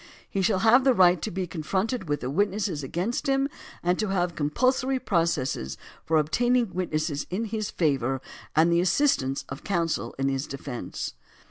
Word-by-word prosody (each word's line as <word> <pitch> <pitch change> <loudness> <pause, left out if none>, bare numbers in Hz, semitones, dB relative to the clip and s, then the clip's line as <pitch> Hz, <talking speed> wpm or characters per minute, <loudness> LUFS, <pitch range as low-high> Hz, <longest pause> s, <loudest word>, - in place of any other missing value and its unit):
He 195 - -2
shall 190 +1 +2
have 245 +4 +6
the 260 -2 +4
right 180 -3 +5
to - - -2
be 185 +1 -2
confronted 185 - -2
with 145 - 0
the 125 - -3
witnesses 195 -2 0
against 180 - -2
him 270 0 +2 0.4
and 180 +1 +1
to 215 - 0
have 180 -3 0
compulsory 255 - +1
processes 165 - 0 0.3
for 160 - +2
obtaining 240 +9 +2
witnesses 155 -4 -2
in 200 +6 -2
his 215 -1 -3
favor 135 -5 0 0.4
and 165 +2 +5
the 170 0 +4
assistance 180 - +1
of 135 - -7
counsel 170 -4 -1
in 135 0 0
his 135 +1 -1
de 135 - -6
fence. 130 -3 -5
175 Hz, 170 wpm, -26 LUFS, 150-215 Hz, 0.4 s, have